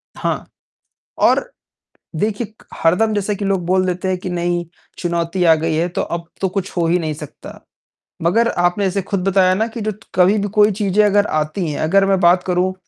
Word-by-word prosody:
हाँ, - - -2 0.7
और - - +2 0.7
देखिए 210 +6 -1
क - - -21 0.2
हरदम 185 +7 +3
जैसे 205 0 -1
कि 200 - -4
लोग 195 -3 0
बोल 185 +1 +2
देते 180 +1 -2
हैं 185 -1 0
कि 180 - -6
नहीं, 175 0 -1 0.3
चुनौती 170 +1 -1
आ 165 -2 +6
गई 160 +1 -1
है, 165 +2 +1
तो 175 - -2
अब 170 -1 -4
तो 190 - +1
कुछ 190 0 -3
हो 170 - +2
ही 175 +2 +2
नहीं 155 -2 -2
सकता। 150 -1 -10 0.6
मगर 210 +8 +2
आपने 175 +2 +1
ऐसे 195 +1 0
खुद 190 0 -3
बताया 185 -1 +4
ना 220 +4 0
कि 230 0 -7
जो 215 +1 -1
त 210 +1 -15
कभी 185 +3 +4
भी 205 0 -1
कोई 210 0 +6
चीज़ें 205 0 +1
अगर 205 0 +3
आती 155 +4 -1
हैं, - - -4
अगर 195 +5 +3
मैं 195 -1 +2
बात 180 +1 +4
करूँ 180 +1 0
185 Hz, 210 wpm, -18 LUFS, 175-200 Hz, 0.7 s, आ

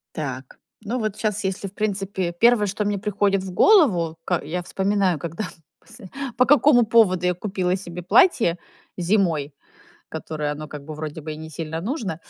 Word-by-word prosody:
Так, 135 -4 -6 0.2
ну, 230 +4 -3
вот 215 -1 -3
щас, 210 -2 -2
если, 190 +1 -3
в 190 - -13
принципе, 195 -4 -2
1, 215 +3 +3
что 205 +2 -2
мне 205 0 0
приходит 200 -1 0
в 190 - -6
голову, 185 - +4
ка 175 -1 -1
я 175 +4 -4
вспоминаю, 190 -3 0
когда 170 +6 -5 0.4
посл 230 -1 -17 0.3
по 250 - +5
какому 275 -4 +5
поводу 195 -6 +3
я 180 - +2
купила 185 -1 -2
себе 180 -2 -7
платье 225 - +4 0.4
зимой, 170 -6 0 0.6
которое, 155 -2 -4
оно 150 +1 -7
как 145 -2 -9
бы, 155 - -8
вроде 155 0 -6
бы, 155 0 -5
и - - -7
не 160 0 -9
сильно 160 +1 -5
нужно, 195 - -4
185 Hz, 175 wpm, -23 LUFS, 160-210 Hz, 0.6 s, по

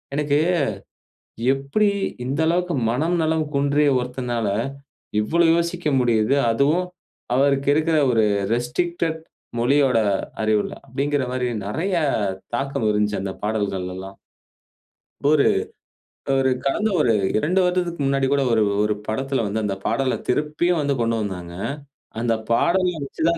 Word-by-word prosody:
எனக்கு 145 0 +1 1.1
எப்டி 140 +11 0 0.4
இந்த 135 +4 -2
அளவுக்கு 175 +1 +1
மனம்நலம் 160 +5 +1
குன்றிய 145 +1 +2
ஒருத்தனால, 125 -2 -3 0.7
இவ்ளோ 170 +11 +2
யோசிக்க 170 0 -2
முடியுது. 120 0 +2 0.2
அதுவும் 145 +10 +2 0.5
அவருக்கு 140 +1 +2
இருக்குற 160 +1 +2
ஒரு 110 -2 +3 0.3
ரெஸ்ட்ரிக்டட் 160 +7 -1 0.4
மொழியோட 130 0 +3 0.4
அறிவுல? 110 -1 +1 0.2
அப்டிங்குற 140 +1 -1
மாரி, 125 -1 -1 0.2
நெறைய 175 - -2 0.6
தாக்கம் 135 -3 -2
இருந்துச்சு 105 0 +1
அந்த 95 0 -3
பாடல்கள்ல 100 -4 -2
எல்லாம். 95 +1 -8 1.1
இப்போரு 145 0 +4 0.9
ஒரு 130 0 +2 0.2
கடந்த 210 +11 +1
ஒரு 120 -6 +3 0.2
2 180 +11 +1
வருடத்துக்கு 180 -3 0
முன்னாடி 135 0 +1
கூட 140 -1 +3
ஒரு 110 - +3 0.2
ஒரு 105 0 +1
படத்துல 135 +2 -1
வந்து 110 +2 -2
அந்த 100 -2 -1
பாடல 135 -2 0
திருப்பியும் 155 +5 +1
வந்து 140 -1 0
கொண்டு 115 0 +1
வந்தாங்க. 90 -4 -5 0.7
அந்த 120 -1 +1 0.2
பாடல 180 +10 +3 0.2
வச்சு 150 - -6
தான் 170 0 +2
135 Hz, 120 wpm, -22 LUFS, 115-160 Hz, 1.1 s, இப்போரு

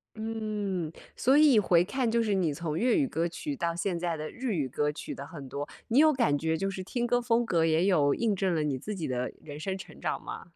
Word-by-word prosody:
嗯， 210 -6 -3 0.2
所 265 +4 +4
以 290 -7 +7
回 175 -3 +4
看 240 +4 -1
就 230 0 +2
是 210 -2 0
你 170 -6 +1
从 160 0 -3
粤 240 +3 +3
语 280 -4 +2
歌 165 -3 -1
曲 285 - -5
到 170 -6 -1
现 175 0 -1
在 170 -2 -1
的 155 0 -5
日 250 -4 -3
语 140 -4 0
歌 150 +4 0
曲 150 - -7
的 140 - -7
很 145 -6 -9
多， 140 +3 -5 0.2
你 250 +5 +4
有 310 0 +7
感 155 - +2
觉 160 +1 0
就 195 +3 -1
是 190 -1 -5
听 240 +5 -2
歌 245 +1 +2
风 235 0 +2
格 165 -6 +2
也 165 +3 +3
有 150 -7 +4
印 220 -4 +1
证 185 -3 0
了 155 - +1
你 140 -3 -1
自 210 +6 -5
己 165 - -3
的 125 0 -2
人 145 -1 -8
生 190 +3 -3
成 190 - -11
长 - - -2
吗？ - - -7
185 Hz, 275 characters per minute, -29 LUFS, 155-230 Hz, 0.2 s, 以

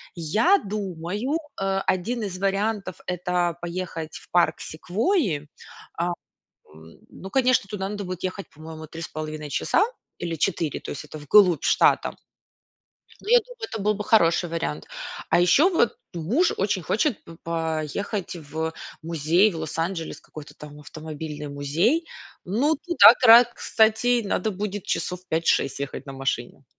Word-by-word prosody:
Я 215 - +3
думаю, 200 - -3 0.2
э, 195 0 +1
один 220 +6 -1
из 185 -2 -5
вариантов- 195 -1 -1
это 180 -1 -1
поехать 170 -2 -5
в - - -17
парк 175 -2 +3
Секвойи. 185 - -1 0.5
А, 170 - 0 0.7
м, 80 +1 -15
ну 190 - -10
конечно, 255 -3 +2
туда 195 -2 -3
надо 205 0 -4
будет 185 -2 -6
ехать, 185 +1 -4
по-моему, 160 0 -10
3,5 155 -2 -6
часа 340 - +2 0.3
или 170 -1 -3
4, 165 -2 -1
то - - -7
есть 140 - -6
это 150 - -9
вглубь 170 +2 +4
штата. - - +3 1.1
Ну - - -10
я - - +7
думаю, 475 -1 -8
это 220 - -3
был 210 +1 +2
бы 210 0 -5
хороший 175 -5 +3
вариант. 165 0 -3 0.4
А - - +4
еще 225 - +5
вот 325 - +2 0.2
муж 225 - +1
очень 195 -1 0
хочет 225 - 0
п 165 - -12
поехать 165 +4 -3
в 160 +1 -4 0.3
музей 165 +5 +2
в 165 - -6
Лос-Анджелес, 165 +2 -3
какой-то 150 -2 -12
там 150 0 -11
автомобильный 150 0 -7
музей. 160 - 0 0.4
Ну, 255 - +1
туда, 280 - +7
кра 235 0 +10
кстати, 235 0 +2
надо 215 +2 -1
будет 205 0 -4
часов 180 +2 -2
5-6 160 -4 +1
ехать 140 0 -5
на 135 - -7
машине. 135 -1 -3
180 Hz, 145 wpm, -24 LUFS, 160-210 Hz, 1.1 s, кра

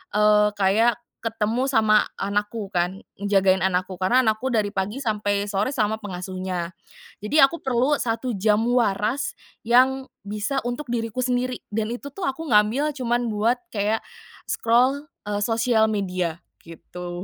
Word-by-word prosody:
eee, 210 0 +5
kayak 210 +4 +3 0.3
ketemu 225 +2 -1
sama 215 -4 +4 0.2
anakku 205 +2 -2
kan, 180 0 -1 0.2
ngejagain 195 -2 +2
anakku, 185 0 0
karena 190 +8 +2
anakku 240 +1 +1
dari 210 -3 0
pagi 200 +6 -2
sampai 205 -4 -1
sore 205 +5 0
sama 220 -5 0
pengasuhnya. 185 -3 -5 0.5
Jadi, 255 +9 +2
aku 335 +5 +3
perlu 260 +2 +2
1 230 +2 -1
jam 210 +2 +2
waras, 235 +2 +1 0.3
yang 260 +3 +3 0.2
bisa 210 +6 -2
untuk 245 +3 -4
diriku 230 0 -2
sendiri, 250 0 -1
dan 215 +1 -1
itu 285 +3 -9
tuh, 385 +7 -8
aku 295 +5 -3
ngambil 225 +8 +3
cuman 240 -2 0
buat 220 +4 +2 0.2
kayak, 215 +1 0 0.5
scroll, 255 +6 +2 0.2
eee, 205 0 -1
sosial 225 -1 +2
media, 185 -5 -2 0.2
gitu. 175 +2 -8
215 Hz, 140 wpm, -24 LUFS, 200-245 Hz, 0.5 s, eee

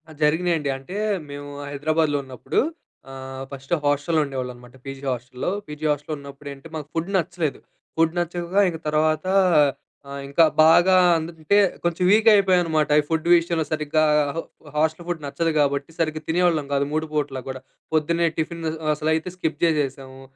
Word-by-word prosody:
ఆ! - - -11
జరిగినయండి 160 -1 +1
అంటే 135 +8 -10 0.3
మేము 145 0 -7 0.2
హైదరాబాద్‌లో 150 +1 0
ఉన్నప్పుడు 130 -2 -3 0.5
ఆహ్, 130 0 -7
ఫస్ట్ 135 -1 -10
హాస్టల్‌లో 145 +3 +1
ఉండేవాళ్ళమనమాట 125 -2 -7
పీజీ 135 0 -7
హాస్టల్‌లో. 125 +3 -4 0.2
పీజీ 150 +1 -6
హాస్టల్‌లో 150 +1 -3
ఉన్నప్పుడేంటి? 140 +1 -10
మాకు 150 -2 -5
ఫుడ్ 165 +3 -2
నచ్చలేదు. 165 -4 -1 0.4
ఫుడ్ 165 0 +3
నచ్చక 175 +1 -3
ఇంక 165 - -5
తర్వాత 155 +1 +1 0.9
ఆహ్, 140 - -5
ఇంకా 140 +4 +4 0.2
బాగా 175 +4 +6 0.2
అందట్టే 165 +3 0 0.3
కొంచెం 175 +1 0
వీక్ 215 +2 +4
అయిపోయాన్నమాట. 175 -6 +3
ఈ - - -13
ఫుడ్ 160 0 -1
విషయంలో 170 -2 +2
సరిగ్గా 155 0 +1 0.3
హ - - -1 0.4
హాస్టల్ 160 +2 0
ఫుడ్ 175 -3 -3
నచ్చదు 165 +4 -1
గాబట్టి 140 +1 +1
సరిగ్గా 155 -1 -1
తినేవాళ్ళం 165 -3 +2
గాదు 140 0 +1
3 155 +1 0
పూటలా 145 -3 -2
కూడా. 130 0 -5 0.3
పొద్దున్నే 165 +2 +2
టిఫిన్ 165 +1 -3 0.3
అసలైతే 160 +3 -1
స్కిప్ 160 -4 -3
జేసేసాము. 135 -4 -1
155 Hz, 145 wpm, -23 LUFS, 140-165 Hz, 0.9 s, బాగా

